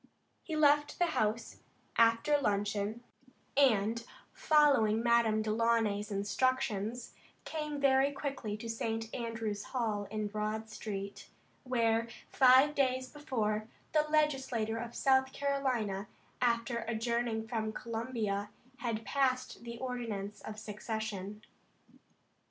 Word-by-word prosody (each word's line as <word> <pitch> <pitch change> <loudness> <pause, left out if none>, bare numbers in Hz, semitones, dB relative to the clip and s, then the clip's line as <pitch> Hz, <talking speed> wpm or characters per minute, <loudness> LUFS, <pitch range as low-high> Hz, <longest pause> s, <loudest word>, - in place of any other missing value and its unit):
He 320 - -5
left 295 -1 +4
the 355 - +3
house 215 +2 -1 0.4
after 230 +6 +4
luncheon, 205 +1 -1 0.5
and, 230 -4 +3 0.3
following 275 -8 +4
Madame 235 -2 +3
Delaunay's 215 -2 +1
instructions, 220 +2 -1 0.3
came 300 -2 -3
very 275 0 +4
quickly 275 -7 -4
to 230 - -7
St. 225 0 -3
Andrew's 225 -3 -3
hall 215 -5 -2
in 215 0 -2
Broad 215 +1 -3
street, 200 -2 -6 0.4
where 230 -2 +2 0.2
five 265 +2 +6
days 260 -2 +1
before, 220 -8 -2 0.2
the 305 - +4
Legislature 265 -7 +1
of 235 0 -6
South 265 0 +3
Carolina, 255 -8 -1 0.3
after 235 -1 +1
adjourning 235 -1 -1
from 220 -2 -2
Columbia, 225 -3 -3 0.3
had 225 -2 -3
passed 255 -2 0
the 235 0 -7
ordinance 230 -5 -4
of 215 - -7
secession. 210 -1 -5
230 Hz, 105 wpm, -33 LUFS, 215-260 Hz, 0.5 s, five